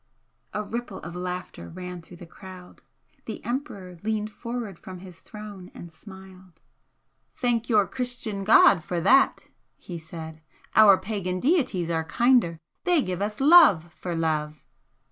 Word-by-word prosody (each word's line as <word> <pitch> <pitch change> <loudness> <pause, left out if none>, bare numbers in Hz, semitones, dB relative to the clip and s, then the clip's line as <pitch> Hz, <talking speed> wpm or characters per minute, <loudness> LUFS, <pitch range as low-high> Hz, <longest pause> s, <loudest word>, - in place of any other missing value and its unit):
A 210 - -3
ripple 230 -2 -5
of 175 - -8
laughter 180 0 -6
ran 180 0 -8
through 175 +2 -15
the 175 - -11
crowd. 185 +1 -13 0.4
The - - -7
Emperor 200 - -5
leaned 215 0 -2
forward 235 -6 -6
from 185 -1 -10
his 180 -2 -13
throne 205 -4 -10
and 170 - -10
smiled. 190 -1 -15 0.8
"Thank 240 -2 -1
your 210 -4 +4
Christian 240 -3 -4
God 195 -5 +6
for 175 +1 -3
that!" 265 +11 +3 0.3
he 175 -2 -8
said 160 -1 -9 0.3
"Our 205 -3 +8
pagan 185 -2 -3
deities 245 - +1
are 160 -1 0
kinder! 235 -2 +2 0.3
They 350 -6 +2
give 185 0 -4
us 210 +1 -3
love 275 - +6
for 175 -2 -5
love!" 155 -2 -2
190 Hz, 145 wpm, -25 LUFS, 175-220 Hz, 0.8 s, Our